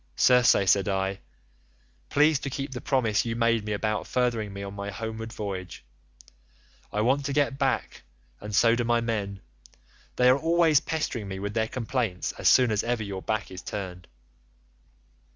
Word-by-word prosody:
'Circe,' 125 -1 +5
said 100 +1 +3
I, 95 0 -1 0.9
'please 150 0 +4
to 140 - -4
keep 135 +1 -4
the 125 -1 -6
promise 115 -7 +1
you 115 -1 -3
made 115 -1 +2
me 105 - -4
about 105 +1 -1
furthering 120 -4 0
me 100 0 -7
on 100 0 -6
my 100 0 -5
homeward 110 +2 -6
voyage. 95 - -6 1.1
I 105 - -1
want 135 +5 +2
to 140 - -2
get 140 -1 +1
back 135 -1 -1 0.4
and 105 -1 -5
so 115 -1 +5
do 120 0 0
my 120 0 +2
men, 105 -4 -3 0.7
they 125 - +4
are 130 +2 +5
always 165 -2 +4
pestering 150 -9 -3
me 95 0 -5
with 100 +2 -4
their 110 0 0
complaints 115 -6 -2
as - - +4
soon 125 -3 +5
as 105 0 0
ever 120 -1 -1
your 100 -2 -5
back 110 -1 -3
is 90 -1 -8
turned. 90 -3 -6
115 Hz, 170 wpm, -26 LUFS, 100-125 Hz, 1.1 s, Circe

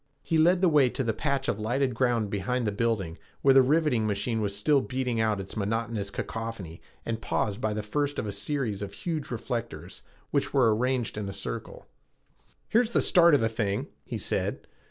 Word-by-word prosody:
He 160 - +1
led 175 +3 +4
the 185 - +5
way 145 -6 +5
to 135 - -3
the 115 -2 0
patch 140 +3 -1
of 110 - -1
lighted 125 +4 0
ground 115 -4 +1
behind 115 +5 -1
the 105 - +1
building 100 -6 -1 0.2
where 135 - +6
the 135 - +8
riveting 135 -5 +2
machine 110 +2 -1
was 100 -1 -1
still 140 +7 +3
beating 130 -3 -1
out 110 -2 +1
its 95 - -7
monotonous 110 0 -2
cacaphony 105 -5 -5 0.2
and 115 -1 -3
paused 105 +1 -1
by 110 -1 0
the 105 - -3
first 145 +6 -1
of - - -2
a 105 - -3
series 105 0 -3
of 100 -1 -5
huge 160 - -4
reflectors, 115 - -5 0.3
which - - 0
were 120 -5 +5
arranged 125 -2 -1
in 100 -2 -4
a - - -5
circle. - - -6 0.8
"Here 230 - +4
is 235 - -2
the - - +2
start 170 -4 +6
of 140 - +2
the 115 - +3
thing," 105 -3 -2
he - - -5
said. - - -1
115 Hz, 200 wpm, -28 LUFS, 105-135 Hz, 0.8 s, the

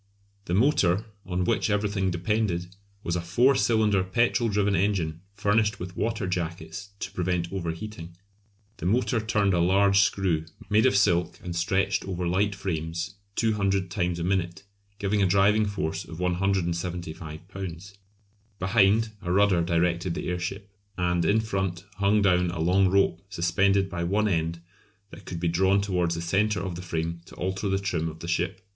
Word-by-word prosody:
The 85 - -1
motor, 105 - +3 0.2
on 90 0 -1
which 90 - +1
everything 100 -2 0
depended, 90 0 -1 0.3
was 85 - -1
a 90 - -1
four 120 +11 +3
cylinder 110 -6 +2
petrol 115 +4 +1
driven 100 -1 +1
engine, 85 -4 0
furnished 105 +1 +1
with 90 +1 -7
"water 110 -2 -1
jackets" 85 +1 -4
to - - -4
prevent 90 -1 -2
over 90 -4 -2
heating. 85 -1 -7 0.6
The - - -3
motor 120 +3 +2
turned 105 -2 +1
a 85 - +2
large 100 +3 +4
screw 95 -6 +1 0.3
made 110 +4 +5
of 100 - +3
silk 90 -3 +2
and 90 -1 -5
stretched 95 +3 +1
over 90 -2 -3
light 100 +3 +1
frames 85 -1 -3 0.2
200 100 -4 0
times 90 -1 -1
a 85 - -3
minute, 90 0 -1 0.3
giving 100 +1 0
a 95 - +4
driving 100 +3 +3
force 95 -6 -3
of 80 0 -10
175 85 -3 -2
lbs. 95 0 -7 0.6
Behind, 105 +3 +3
a 90 - -3
rudder 100 -2 +4
directed 85 +1 0
the - - -3
airship, 95 +3 -4 0.2
and 90 -1 +1
in 105 +5 +3
front 95 -4 -3
hung 100 +1 +3
down 90 -2 +3
a 85 -1 -5
long 95 +4 +3
rope 100 +1 +2
suspended 95 +2 +2
by 85 -2 -4
one 105 +5 +1
end 85 -3 -1 0.5
that - - -12
could 85 - -5
be 85 - -1
drawn 95 +4 +3
towards 90 -4 0
the 85 - -4
centre 100 +3 +1
of 95 -1 -4
the 85 - -6
frame 85 -1 -3
to - - -14
alter 95 +2 -2
the 95 - +2
trim 90 -5 -1
of 80 - -9
the 85 - -6
ship. 90 +2 -1
95 Hz, 170 wpm, -26 LUFS, 85-100 Hz, 0.6 s, made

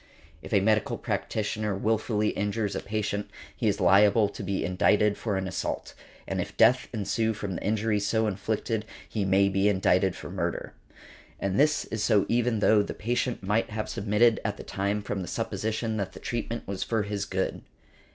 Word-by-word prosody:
If - - -10
a 100 -3 +4
medical 110 +1 +2
practitioner 105 -1 -2
wilfully 105 +1 +1
injures 105 +1 -1
a - - -1
patient 105 -1 -3 0.3
he - - -1
is - - +1
liable 100 +3 +5
to - - -8
be 100 0 -2
indicted 100 +3 +3
for 105 -2 -2
an 95 0 -2
assault, - - -3 0.3
and - - -1
if - - -7
death 125 0 +5
ensue 110 0 0
from 100 -2 -4
the - - -5
injuries 105 -1 0
so 110 -1 +2
inflicted 105 +2 -2 0.2
he 105 -3 -2
may 95 +1 +4
be 100 +1 +2
indicted 95 -1 +2
for - - -8
murder. - - -3 0.7
And 100 +2 -1
this 150 +1 +3
is 110 -1 -3
so 105 -4 +3
even 120 -2 +1
though 105 0 +5
the 100 - -4
patient 120 0 -1
might 105 +4 +1
have 110 0 -3
submitted 105 +3 +3
at 105 -1 -2
the - - -8
time 100 +1 -2
from 100 -1 -3
the 90 - -5
supposition 110 +4 -2
that 100 -2 -3
the - - -10
treatment 115 0 -4
was 100 -1 -4
for 110 -2 0
his 100 -1 -3
good. 95 -1 -2
105 Hz, 185 wpm, -27 LUFS, 100-110 Hz, 0.7 s, liable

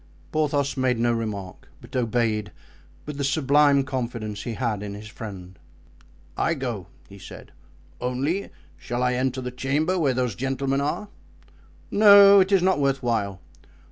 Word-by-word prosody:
Porthos 145 -2 0
made 130 -2 +1
no 120 +1 +1
remark, 105 -6 -5
but - - -13
obeyed, 115 -3 0 0.5
with 150 -1 -6
the - - -1
sublime 140 0 +3
confidence 120 -5 -4
he 115 - -5
had 115 -5 -2
in 100 -1 -6
his 105 +1 -9
friend. 95 -4 -9 0.8
"I 170 - 0
go," 120 - -5 0.2
he 100 0 -14
said, - - -12 0.5
"only, 135 +10 -2 0.3
shall 120 +1 -3
I 125 0 +2
enter 130 +1 -1
the 125 0 -5
chamber 150 +8 -1
where 140 -6 +1
those 125 -3 -1
gentlemen 135 +3 -1
are?" 150 +8 -3 0.8
"No, 200 -1 +8
it 190 +1 +2
is 195 -3 +4
not 185 -4 +2
worth 140 -1 0
while." 100 -6 -1
130 Hz, 150 wpm, -24 LUFS, 115-145 Hz, 0.8 s, No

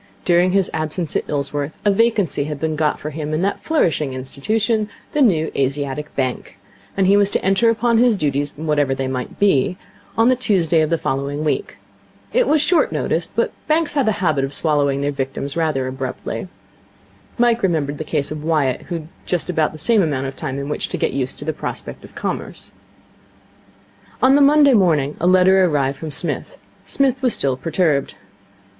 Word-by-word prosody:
During 175 +1 +4
his 195 -1 +2
absence 155 +1 -3
at - - 0
Ilsworth 145 +1 -3
a 205 - +5
vacancy 205 -8 +1
had 150 -1 -5
been 160 0 -1
got 150 -1 0
for 150 - -6
him 155 0 -3
in 165 - -1
that 200 - -1
flourishing 160 - 0
institution, 210 - -1 0.2
the 300 - 0
New 165 - +3
Asiatic 140 +2 -2
Bank; 130 -2 -3 0.4
and 195 - +3
he 195 +2 +5
was 205 -1 +4
to - - -2
enter 195 +4 +3
upon 230 0 +2
his 240 -2 +4
duties, 145 -3 -1
whatever 145 -3 0
they 135 0 -2
might 130 -1 -4
be, 185 -3 +2 0.4
on 225 +1 +4
the 255 - +4
Tuesday 180 -9 +2
of 155 - +1
the 165 - +1
following 140 +1 -2
week. 155 - -2 0.6
It - - +3
was 305 -1 +3
short 340 +2 +2
notice, - - -1
but - - -1
banks 315 0 +1
have 280 -5 +1
a 220 - +3
habit 150 -5 +2
of 135 +1 -2
swallowing 145 -3 +1
their 145 +1 0
victims 135 0 -4
rather 155 -6 0
abruptly. 130 +6 -5 0.9
Mike 240 -1 +3
remembered 150 -7 0
the - - -2
case 150 -2 -1
of 155 -1 -5
Wyatt, 150 -6 +1
who 175 - -3
had 165 - -3
had 155 - -16 0.2
just 180 0 -1
about 160 -3 +1
the 155 - -10
same 210 +7 +3
amount 140 -6 -1
of 135 - -5
time 135 0 -4
in 140 0 -4
which 150 - -3
to - - -3
get - - -1
used 130 -1 -2
to 145 - -8
the 155 - -1
prospect - - -7
of - - -14
Commerce. - - -5 1.5
On 260 +1 +5
the 285 - +5
Monday 285 -1 +6
morning 155 - +2
a 175 - +1
letter 185 +1 +5
arrived 140 -5 0
from 160 - -5
Psmith. 160 +4 -3 0.3
Psmith 270 -2 +1
was 250 -3 +3
still 135 -2 0
perturbed. 155 -1 0
155 Hz, 195 wpm, -20 LUFS, 140-200 Hz, 1.5 s, Monday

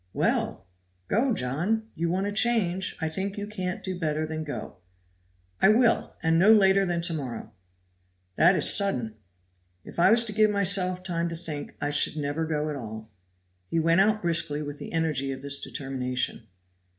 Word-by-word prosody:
"Well! - - -1 0.4
go, 245 +5 +1
John! 200 - -1
you 170 0 -2
want 185 +3 -1
a 205 - -2
change. 205 -5 +1
I 160 - -1
think 190 +5 -4
you 205 - -4
can't 185 -4 -5
do 185 -2 -4
better 155 -1 -1
than 155 0 -5
go." 145 -1 -7 0.8
"I 190 - +6
will, 230 +2 +2
and 165 0 +3
no 200 +5 +6
later 195 -2 +4
than 175 -1 -1
to 170 -1 +2
morrow." 130 -7 -6 0.8
"That 175 - +5
is - - +5
sudden." 130 - -1 0.7
"If - - -10
I 175 - +5
was 230 +2 +5
to 215 - -2
give 215 0 +3
myself 190 -2 +2
time 170 -2 -2
to 165 - -5
think, 160 -4 -7
I 145 - -1
should 145 +1 +3
never 150 +2 -2
go 155 -1 -2
at - - -4
all." 110 -3 -8 0.6
He 165 - -1
went 165 +3 +3
out 215 +1 +1
briskly 165 -3 +1
with 145 0 -7
the - - -8
energy 155 -5 -1
of 135 0 -7
this 140 0 +3
determination. 125 -4 -4
170 Hz, 180 wpm, -26 LUFS, 145-195 Hz, 0.8 s, I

